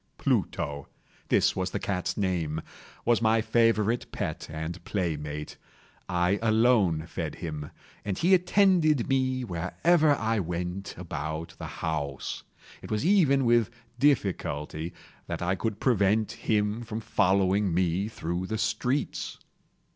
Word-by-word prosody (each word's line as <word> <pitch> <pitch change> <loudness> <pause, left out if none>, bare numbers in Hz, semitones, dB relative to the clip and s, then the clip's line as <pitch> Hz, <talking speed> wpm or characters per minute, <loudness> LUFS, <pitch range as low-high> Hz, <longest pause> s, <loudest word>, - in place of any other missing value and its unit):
Pluto—this 70 -1 -1
was 95 -1 -1
the - - -3
cat's 90 -1 -2
name—was 90 +5 -2
my 110 0 +4
favorite 115 0 +2
pet - - -4
and 80 +3 -5
playmate. 75 -6 -3 0.5
I 90 +2 +2
alone 110 -8 +3
fed 85 - -4
him, 75 -2 -5 0.3
and 100 -3 -2
he 180 +3 +3
attended 180 - +4
me 130 -1 +1
wherever 145 - +2
I 115 -3 0
went 90 +2 -4
about 80 -1 -5
the - - -5 0.2
house. 70 -4 -3 0.4
It - - -10
was 110 +6 -1
even 150 -9 +4
with 120 -2 +4 0.3
difficulty 85 - 0 0.4
that - - -3
I 90 +1 +1
could 105 +2 -2
prevent 110 -3 +2
him 105 +1 0
from 115 -2 -5
following 100 -2 +2
me 90 +3 +1
through 90 -4 -3
the 110 - -2
streets. 110 +6 -1
100 Hz, 120 wpm, -28 LUFS, 85-120 Hz, 0.5 s, my